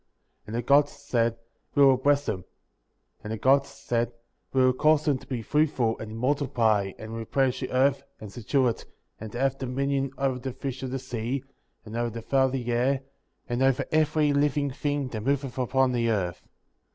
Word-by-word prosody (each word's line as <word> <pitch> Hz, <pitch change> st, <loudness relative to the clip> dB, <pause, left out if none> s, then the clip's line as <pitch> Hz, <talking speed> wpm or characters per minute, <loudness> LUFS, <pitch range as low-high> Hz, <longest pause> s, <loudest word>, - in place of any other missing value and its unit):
28. -, -, -34 dB
And 110 Hz, -, -5 dB
the 120 Hz, 0 st, -2 dB
Gods 145 Hz, +1 st, +5 dB
said: 120 Hz, -5 st, 0 dB, 0.4 s
We 140 Hz, -1 st, +7 dB
will 135 Hz, -1 st, +6 dB
bless 145 Hz, +2 st, +2 dB
them* 90 Hz, -, -3 dB, 0.8 s
And 105 Hz, -, -6 dB
the 110 Hz, -, -2 dB
Gods 135 Hz, +4 st, +3 dB
said: 120 Hz, -3 st, -2 dB, 0.4 s
We 130 Hz, -1 st, +3 dB
will 130 Hz, -, +4 dB
cause 155 Hz, +3 st, +3 dB
them 140 Hz, -4 st, +2 dB
to -, -, -16 dB
be 125 Hz, -4 st, -3 dB
fruitful, 135 Hz, -5 st, +1 dB
and 110 Hz, 0 st, -7 dB
multiply, 120 Hz, -7 st, +1 dB
and 110 Hz, +1 st, -8 dB
replenish 130 Hz, +3 st, 0 dB
the -, -, -4 dB
earth, 135 Hz, +2 st, +3 dB, 0.2 s
and 105 Hz, -2 st, -9 dB
subdue 125 Hz, +4 st, +1 dB
it, 115 Hz, -, -5 dB, 0.3 s
and 110 Hz, 0 st, -7 dB
to 120 Hz, -, -5 dB
have 135 Hz, 0 st, +1 dB
dominion 135 Hz, +1 st, -1 dB
over 135 Hz, -2 st, 0 dB
the 130 Hz, 0 st, -5 dB
fish 135 Hz, 0 st, -5 dB
of 130 Hz, -, -3 dB
the 135 Hz, -, -2 dB
sea, 125 Hz, 0 st, -3 dB, 0.4 s
and 110 Hz, +1 st, -8 dB
over 120 Hz, 0 st, 0 dB
the 115 Hz, 0 st, -7 dB
fowl 135 Hz, +2 st, +3 dB
of 130 Hz, -, -5 dB
the 125 Hz, -2 st, -2 dB
air, 130 Hz, +3 st, +1 dB, 0.5 s
and 120 Hz, 0 st, -2 dB
over 135 Hz, -1 st, +3 dB
every 155 Hz, -1 st, +3 dB
living 145 Hz, 0 st, +1 dB
thing 145 Hz, 0 st, -2 dB
that 110 Hz, -4 st, -5 dB
moveth 135 Hz, +1 st, -1 dB
upon 130 Hz, +1 st, +2 dB
the 120 Hz, -2 st, +1 dB
earth. 95 Hz, -6 st, -1 dB
130 Hz, 200 wpm, -27 LUFS, 115-140 Hz, 0.8 s, We